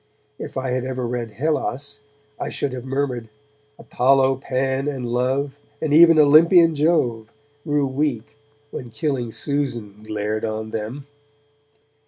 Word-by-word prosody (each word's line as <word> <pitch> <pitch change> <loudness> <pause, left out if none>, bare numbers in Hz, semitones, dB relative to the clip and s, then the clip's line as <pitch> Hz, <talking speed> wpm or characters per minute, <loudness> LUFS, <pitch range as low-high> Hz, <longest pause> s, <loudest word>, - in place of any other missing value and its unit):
If - - -7
I 130 -1 -2
had 125 0 -1
ever 130 -1 -3
read 120 -1 -3
'Hellas' 145 +1 -2 0.4
I - - -3
should 140 -3 -3
have 125 -1 -6
murmured 130 -4 -2 0.5
Apollo, 135 +1 +2
Pan 135 +1 -1
and 130 -4 -3
Love, 135 +4 -1 0.2
And 155 -2 -1
even 165 +1 +7
Olympian 165 +3 +6
Jove, 135 -8 +1 0.3
Grew 145 -2 +1
weak, 130 -4 -2 0.4
when 125 - -7
killing 120 0 -2
Susan 120 -8 -3
glared 105 0 -3
on 110 0 -3
them. 115 +6 -5
130 Hz, 130 wpm, -22 LUFS, 120-145 Hz, 0.5 s, even